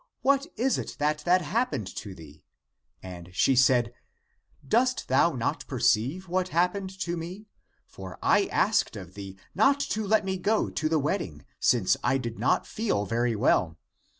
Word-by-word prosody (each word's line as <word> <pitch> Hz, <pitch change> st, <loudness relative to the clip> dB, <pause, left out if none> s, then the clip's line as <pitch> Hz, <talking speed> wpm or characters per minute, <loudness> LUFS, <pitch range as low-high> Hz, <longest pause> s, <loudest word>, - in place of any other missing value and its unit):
What 275 Hz, +2 st, +2 dB
is 260 Hz, +3 st, +1 dB
it -, -, -6 dB
that 150 Hz, +1 st, 0 dB
had 180 Hz, +3 st, +2 dB
happened 220 Hz, -, -1 dB
to 100 Hz, -4 st, -7 dB
thee? 75 Hz, -3 st, -14 dB, 0.6 s
And 90 Hz, -2 st, -9 dB
she 135 Hz, -, +3 dB
said, 125 Hz, -2 st, +3 dB, 0.7 s
Dost 250 Hz, -, +1 dB
thou 140 Hz, +6 st, +3 dB
not 120 Hz, -3 st, -3 dB
perceive 140 Hz, -, +1 dB
what 185 Hz, +1 st, 0 dB
happened 180 Hz, +3 st, 0 dB
to 175 Hz, -1 st, -2 dB
me? 175 Hz, +5 st, -7 dB, 0.4 s
For 95 Hz, -1 st, -10 dB
I -, -, +3 dB
asked -, -, +1 dB
of -, -, -9 dB
thee 95 Hz, -1 st, -9 dB, 0.2 s
not 275 Hz, +9 st, +3 dB
to 215 Hz, -1 st, -2 dB
let 215 Hz, 0 st, +2 dB
me 190 Hz, 0 st, -2 dB
go 210 Hz, +4 st, 0 dB
to 155 Hz, -, -1 dB
the 160 Hz, -, +2 dB
wedding, 140 Hz, -, -3 dB
since -, -, +3 dB
I 135 Hz, -, +2 dB
did 120 Hz, -3 st, -6 dB
not -, -, +1 dB
feel 205 Hz, -, -1 dB
very 115 Hz, +2 st, 0 dB
well. 90 Hz, -7 st, +1 dB
155 Hz, 165 wpm, -27 LUFS, -, 0.7 s, she